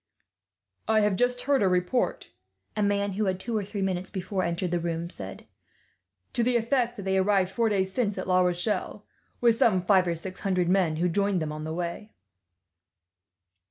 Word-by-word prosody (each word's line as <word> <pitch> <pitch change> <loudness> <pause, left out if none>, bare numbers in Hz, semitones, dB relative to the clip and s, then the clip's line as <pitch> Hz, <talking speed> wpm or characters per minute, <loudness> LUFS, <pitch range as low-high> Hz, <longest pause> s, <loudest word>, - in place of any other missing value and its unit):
"I 220 -1 +4
have 210 -2 +2
just 245 +4 +1
heard 280 -1 +2
a 195 - +4
report," 180 +7 0 0.4
a 210 - -1
man 200 0 +1
who 210 +3 -1
had, 185 -1 -1
two 230 +4 -3
or 210 - 0
three 200 0 -4
minutes 185 -1 -2
before, 190 0 -3
entered 170 0 -2
the 175 - +1
room 170 0 -3
said, 95 - -9 0.9
"to - - 0
the 240 +1 +3
effect 240 0 0
that 200 - -6
they 190 0 +1
arrived 190 -1 +2
four 230 +2 +1
days 190 -2 0
since 210 -6 0
at 185 - -4
La 185 0 +4
Rochelle, 180 +4 -1 0.4
with 235 -2 +4
some 185 -5 +3
five 190 -2 +4
or 170 - 0
six 185 +3 -8
hundred 185 -3 0
men, 180 -4 +2
who 170 +3 +1
joined 200 +2 +1
them 155 -2 -3
on 155 0 -6
the 160 - -4
way." 175 +5 -5
190 Hz, 195 wpm, -27 LUFS, 180-215 Hz, 0.9 s, I